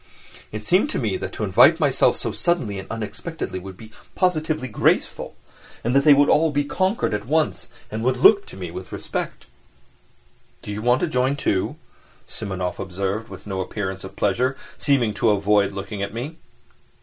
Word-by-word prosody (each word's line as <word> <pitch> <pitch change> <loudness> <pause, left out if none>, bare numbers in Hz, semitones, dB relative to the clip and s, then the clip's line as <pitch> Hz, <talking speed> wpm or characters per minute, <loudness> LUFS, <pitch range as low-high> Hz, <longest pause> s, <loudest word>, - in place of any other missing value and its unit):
It 105 0 -6
seemed 190 - +3
to - - -2
me - - -1
that - - -5
to - - -4
invite - - +6
myself - - +3
so - - -2
suddenly 130 - 0
and 95 - -9
unexpectedly 115 - -5
would 95 0 -10
be 110 +1 -13 0.2
positively 155 -6 0
graceful, 110 - 0 0.5
and 120 +3 0
that 140 - +5
they 150 - +9
would 145 +1 +4
all 160 +2 +4
be 145 -1 0
conquered 185 - 0
at 105 +1 -3
once 155 +2 0 0.2
and 110 +1 -3
would 130 +1 +1
look 200 - +5
at - - -11
me 90 -3 -6
with 90 +1 -8
respect. - - -4 1.2
"Do - - -6
you 105 +1 -4
want 125 +2 +3
to 175 - +1
join, 130 -2 +1
too?" 100 -9 -1 0.5
Simonov 95 -4 -4
observed, 95 +3 -3
with 95 -1 -11
no 95 -2 -3
appearance 95 0 -4
of 95 0 -9
pleasure, 125 +8 +1 0.2
seeming 125 -7 +2
to 110 +2 +2
avoid 100 -1 +3
looking 100 +1 -6
at 100 +2 -4
me. 145 +8 -5
110 Hz, 180 wpm, -23 LUFS, 100-145 Hz, 1.2 s, they